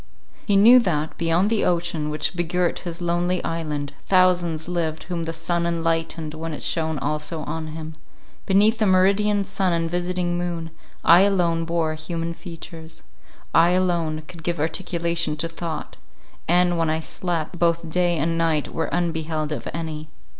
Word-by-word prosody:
He 205 - +3
knew 230 +6 +8
that, 160 -8 -1
beyond 170 +5 +2
the 225 - +2
ocean 170 -3 0
which 150 +4 0
begirt 175 0 0
his 175 -1 -6
lonely 175 +1 0
island, 150 -3 -3
thousands 175 -4 +3
lived 165 -3 -2
whom 170 -2 -4
the 165 - -2
sun 170 +1 -1
enlightened 165 -2 -1
when 160 0 -5
it - - -8
shone 160 -2 0
also 150 +3 -2
on 160 +1 -4
him: 160 0 -7 0.5
beneath 210 +4 +4
the 215 - +3
meridian 200 +2 +3
sun 190 -2 0
and 165 0 0
visiting 175 0 -1
moon, 170 -2 -3 0.3
I 170 +1 +8
alone 175 -4 +2
bore 165 -1 0
human 165 +1 -4
features; 165 -2 -10 0.5
I 170 +2 +5
alone 170 -4 0
could 175 -2 -11
give 170 0 -2
articulation 170 -1 -1
to 165 - -1
thought; 165 -2 -6 0.5
and, 175 0 +3
when 165 -1 +1
I 160 +1 0
slept, 175 0 -3
both 170 -1 +1
day 175 +1 +1
and 165 +2 0
night 160 -3 0
were 165 - -1
unbeheld 160 -3 -1
of 150 - -4
any. 155 -1 -5
170 Hz, 160 wpm, -23 LUFS, 160-175 Hz, 0.5 s, knew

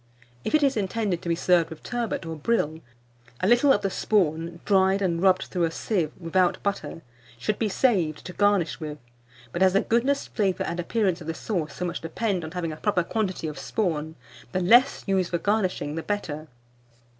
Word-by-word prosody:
If - - +1
it 305 - +3
is 275 -1 +3
intended 200 -3 -1
to 170 - -5
be 170 - +2
served 175 -1 +3
with 160 - -10
turbot 240 -7 -3
or 165 0 -4
brill, 160 -2 0 0.6
a 185 - +1
little 240 +5 +5
of 205 - +2
the 195 - 0
spawn 170 -5 0
(dried 190 -1 +4
and 170 -4 0
rubbed 185 -1 +4
through 175 -2 -1
a - - 0
sieve 165 -2 -1
without 180 +1 +1
butter) 200 -4 -3 0.3
should 165 - -2
be 220 - +1
saved 185 - +1
to 180 - -7
garnish 200 -5 +2
with; 150 -2 -5 0.5
but 175 - -4
as 190 -1 +5
the 195 - +4
goodness, 260 +5 +1
flavour, 195 -4 0
and 170 +1 -3
appearance 185 -1 0
of 160 - -9
the 165 - -2
sauce 165 -8 -3
so 180 - -3
much 175 - -3
depend 185 +2 -2
on 160 - -5
having 170 -1 -3
a 155 - -7
proper 195 -1 +1
quantity 190 -2 -2
of 150 -2 -5
spawn, 160 -7 -2 0.4
the 185 - +1
less 240 +9 +5
used 190 -3 +1
for 175 - 0
garnishing 185 -6 0
the 165 - -3
better. 160 -6 -4
185 Hz, 200 wpm, -26 LUFS, 165-210 Hz, 0.6 s, little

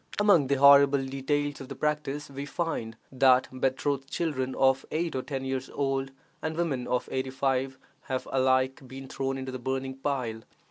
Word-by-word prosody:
Among 195 -9 +5
the 140 - +2
horrible 140 0 +6
details 145 +2 -2
of 135 - -9
the - - -6
practice 150 -1 -2
we 140 +1 -6
find 130 -10 -3
that 130 -1 +4
betrothed 135 +1 -1
children 130 -6 -2
of 135 0 +3
eight 165 0 -2
or 130 - 0
ten 135 -1 -5
years 130 0 -3
old, 135 -1 -1 0.3
and 160 0 -3
women 145 -8 -1
of 125 0 -1
eighty 130 0 -2
five, 130 0 -1 0.3
have 130 -1 -3
alike 130 0 +2
been 135 +1 -9
thrown 135 0 -3
into 130 0 -5
the 130 - -5
burning 130 +1 -3
pile. 130 -5 -3
135 Hz, 175 wpm, -28 LUFS, 130-140 Hz, 0.3 s, horrible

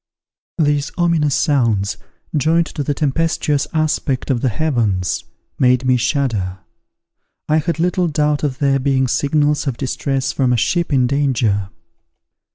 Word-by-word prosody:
These 145 -3 +1
ominous 165 -5 +2
sounds, 115 - +1 0.4
joined 160 +3 +2
to 150 - -6
the 145 0 -1
tempestuous 150 -1 0
aspect 150 -4 -1
of 120 -3 0
the 130 - +1
heavens, 110 - -1 0.3
made 125 0 +3
me 130 0 +4
shudder. 115 -7 -1 0.9
I 155 - +3
had 165 +2 -1
little 180 +1 +1
doubt 150 -1 0
of 135 -3 -1
their 140 -2 +2
being 130 -1 +1
signals 145 +2 +1
of 130 -4 -2
distress 135 0 -2
from 130 -2 +1
a - - +2
ship 170 +8 0
in 130 -3 +3
danger. 120 -8 0
140 Hz, 140 wpm, -18 LUFS, 125-150 Hz, 0.9 s, me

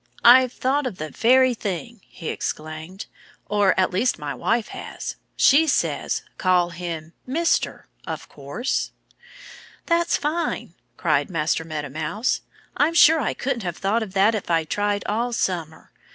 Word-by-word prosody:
"I've 255 +1 +8
thought 265 +2 0
of 195 - -6
the 155 0 -5
very 255 +2 +4
thing!" 210 +1 -5
he 165 - -7
exclaimed. 155 +5 -5 0.4
"Or, 205 -2 +2
at 185 - +2
least, 215 +7 +1
my 145 -1 -4
wife 225 - 0
has. - - -6 0.2
She 310 +4 +5
says, 280 - 0 0.2
'Call 180 -2 +3
him 170 -2 -6
"Mister," 330 +6 0 0.2
of - - -5
course'!" 145 - -3 1.0
"That's 340 0 +2
fine!" 315 +4 -2 0.2
cried - - +1
Master 165 -2 0
Meadow 155 -3 -5
Mouse. 160 - -1 0.3
"I'm 315 +3 +2
sure 320 -1 +7
I 255 - -1
couldn't 255 -3 -2
have 175 -3 -4
thought 205 +4 0
of 205 -4 -5
that 200 +3 +4
if 215 -5 -4
I'd 165 -2 +1
tried 205 0 0
all 235 +3 -1
summer. 170 -7 -3
205 Hz, 150 wpm, -23 LUFS, 165-255 Hz, 1.0 s, I've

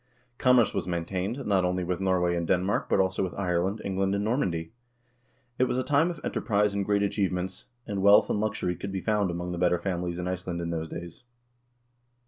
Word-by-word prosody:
Commerce 125 -3 +4
was 95 -3 -2
maintained, 90 +8 -3
not 95 -3 +2
only 90 0 0
with 90 0 -2
Norway 90 -2 +1
and 85 -1 -2
Denmark, 95 +2 +1
but - - +3
also 95 -1 +1
with 95 -2 -2
Ireland, 95 +2 0
England, 95 0 0
and 100 - -1
Normandy. 90 - -1 0.9
It 130 - +5
was 125 - -1
a 130 - +1
time 145 +5 +3
of 170 -3 -5
enterprise 105 -2 +1
and 100 0 0
great 100 0 +1
achievements, 95 -2 -2 0.2
and 100 -3 -3
wealth 100 +1 +6
and - - 0
luxury 105 -4 -1
could 100 +3 -6
be 95 -1 -3
found 105 -2 +1
among 90 +1 -4
the 90 - -4
better 90 0 +3
families 85 -1 -3
in 90 0 -3
Iceland 90 -1 -3
in 85 0 -3
those 80 -1 -3
days. 85 0 -8
95 Hz, 200 wpm, -27 LUFS, 90-100 Hz, 0.9 s, wealth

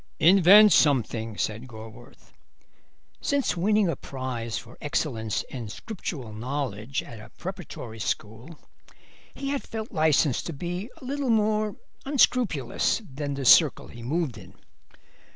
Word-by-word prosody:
"Invent 195 +4 +7
something," 115 -6 +2
said 110 +4 -3
Gorworth. 115 0 -13 0.9
Since 280 -7 0
winning 205 +3 +2
a 165 - 0
prize 125 -4 -5
for 120 - -10
excellence 115 -7 -1
in 120 -5 -6
Scriptural 135 - -6
knowledge 125 0 -3
at 115 - -11
a 110 - -12
preparatory 175 - -7
school 115 +9 -4 0.8
he 275 - -4
had 280 -1 -1
felt 220 0 -6
licensed 155 -4 +2
to 170 - -4
be 175 - -5
a - - -12
little 275 0 -2
more 215 -2 +1 0.3
unscrupulous 240 - +2
than 145 0 -3
the 135 -1 -4
circle 150 +3 +5
he 120 - -11
moved 135 -1 -2
in. - - -15
145 Hz, 130 wpm, -26 LUFS, -, 0.9 s, Invent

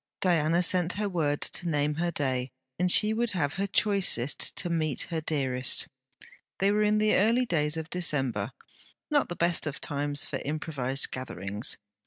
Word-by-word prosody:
Diana 170 -1 +2
sent 180 0 +1
her 210 +1 -2
word 155 -6 -1
to 175 - -2
name 150 -1 +1
her 175 - +1
day, 130 -5 -1 0.3
and 180 0 +2
she 215 +3 +6
would 235 +1 0
have 145 -5 -1
her 195 +1 -2
choicest 195 - +2
to - - -2
meet 160 -4 -1
her 165 -1 -1
dearest. 130 -5 -1 0.7
They 195 +1 +2
were 210 +1 +2
in 210 0 +3
the 215 0 +3
early 230 +6 +3
days 150 -6 0
of 160 +1 -6
December, 135 - -1 0.6
not 290 -2 +2
the 175 - -4
best 170 -2 +1
of 145 - -5
times 145 0 0
for - - -4
improvized 140 -3 -1
gatherings. 105 -4 -2
160 Hz, 170 wpm, -28 LUFS, 140-185 Hz, 0.7 s, she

